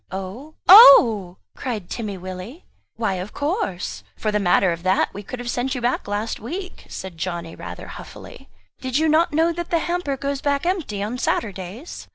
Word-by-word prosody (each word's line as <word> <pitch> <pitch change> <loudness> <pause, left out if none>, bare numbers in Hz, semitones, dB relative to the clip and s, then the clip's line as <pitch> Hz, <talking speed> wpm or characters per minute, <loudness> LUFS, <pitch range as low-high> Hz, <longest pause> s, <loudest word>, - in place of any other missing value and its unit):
"Oh? 195 +11 -7
Oh!" 230 - +8 0.2
cried 220 -8 -4
Timmy 210 -4 -5
Willie. 185 - -8 0.3
"Why 220 -4 -1
of 190 - -8
course 190 - -3
for 215 - -1
the 210 - +1
matter 185 -1 +3
of 170 0 -4
that 185 +2 +1
we 205 - -7
could 210 +5 -7
have 245 0 -7
sent 255 +2 -2
you 250 - -4
back 240 -2 -1
last 205 +2 -3
week," 360 - -7
said 185 -3 -8
Johnny 170 -1 -4
rather - - -8
huffily - - -11 0.3
"did 260 0 -2
you 315 +1 +2
not 325 +3 +3
know 325 +3 +2
that 345 0 -5
the 340 - +2
hamper 340 -5 -2
goes 280 0 -3
back 285 +1 0
empty 320 - -1
on 235 +5 -4
Saturdays?" 200 - -4
235 Hz, 185 wpm, -22 LUFS, 190-295 Hz, 0.3 s, Oh